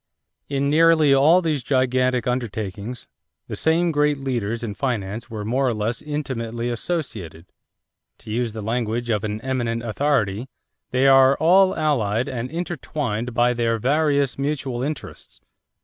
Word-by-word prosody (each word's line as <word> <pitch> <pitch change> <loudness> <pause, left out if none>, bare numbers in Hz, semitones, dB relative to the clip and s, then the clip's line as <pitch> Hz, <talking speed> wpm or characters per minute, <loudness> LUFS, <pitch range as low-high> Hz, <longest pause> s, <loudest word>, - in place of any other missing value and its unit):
In 140 0 0
nearly 155 -1 +5
all 155 +7 +5
these 155 -4 0
gigantic 130 -1 +1
undertakings, 110 -2 -4 0.4
the - - -5
same 165 +2 +2
great 150 -1 +2
leaders 120 -4 -3
in 110 -3 -3
finance 115 -2 -3
were 110 -3 -5
more 130 +5 +1
or 120 - 0
less 110 +2 -2
intimately 120 -6 -3
associated. 110 - -4 0.7
To - - -10
use 115 0 -1
the 110 -2 -6
language 115 +1 -1
of 105 -1 0
an 105 0 -3
eminent 120 -3 -2
authority: 115 -2 0 0.4
"They 130 +2 +1
are 135 0 +6
all 185 +3 +4
allied 120 -7 0
and 125 0 -4
intertwined 145 -9 -3
by 120 +1 +3
their 115 -1 0
various 140 +1 +1
mutual 135 -3 -2
interests. 145 +3 -6
125 Hz, 140 wpm, -22 LUFS, 115-145 Hz, 0.7 s, are